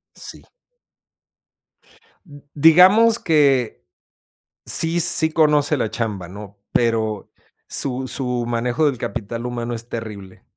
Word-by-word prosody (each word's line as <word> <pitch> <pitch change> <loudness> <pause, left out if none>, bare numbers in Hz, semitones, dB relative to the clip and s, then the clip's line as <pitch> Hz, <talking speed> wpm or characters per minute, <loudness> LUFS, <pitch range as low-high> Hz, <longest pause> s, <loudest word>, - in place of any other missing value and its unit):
Sí. - - -9 1.8
D 145 -4 -15
digamos 185 +9 +5
que 140 - +1 0.8
sí, 165 +1 0
sí, 160 -2 +4
conoce 150 -1 +2
la 115 - -2
chamba, 105 -7 -4
¿no?, 100 +2 -11
pero, 110 -3 -1 0.4
su 130 -1 -2
su 125 -3 -3
manejo 120 +6 -1
del 135 -4 0
capital 115 +1 -6
humano 120 -1 -4
es 115 +1 -9
terrible. 105 -5 -8
125 Hz, 110 wpm, -20 LUFS, 115-155 Hz, 1.8 s, digamos